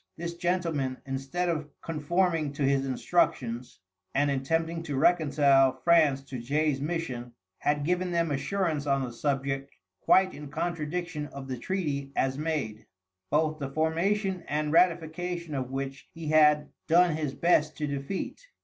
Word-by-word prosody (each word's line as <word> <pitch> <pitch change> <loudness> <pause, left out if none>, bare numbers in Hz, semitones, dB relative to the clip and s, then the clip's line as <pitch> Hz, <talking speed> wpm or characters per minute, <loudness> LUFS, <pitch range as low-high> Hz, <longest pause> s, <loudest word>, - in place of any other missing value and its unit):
This 170 0 -4
gentleman, 170 -7 -1
instead 135 +7 -2
of 155 -3 -2
conforming 165 -1 0
to 145 - -2
his 135 0 +2
instructions, 125 -4 0 0.4
and 145 +1 +3
attempting 165 +5 -1
to 150 -4 -4
reconcile 140 -3 +4
France 155 -6 +4
to 135 -2 -7
Jay's 145 +3 0
mission, 135 -7 -3 0.3
had 145 0 0
given 180 +2 0
them 170 -2 +1
assurance 155 0 -1
on 135 -1 +2
the 120 -2 -5
subject 135 +1 -2 0.3
quite 190 0 +4
in 150 0 -8
contradiction 165 0 -3
of 140 -1 -9
the 130 -1 -4
treaty 145 -6 -2
as 135 0 +1
made, 145 -8 -3 0.4
both 155 +1 +1
the 140 -2 -3
formation 175 +5 0
and 150 0 -1
ratification 170 0 +1
of 130 -2 -2
which 135 0 -5
he 165 -2 -5
had 150 -1 +5 0.2
done 170 0 +5
his 150 -4 -3
best 155 -1 +2
to 150 - -1
defeat. 140 - -4
150 Hz, 145 wpm, -28 LUFS, 135-170 Hz, 0.4 s, had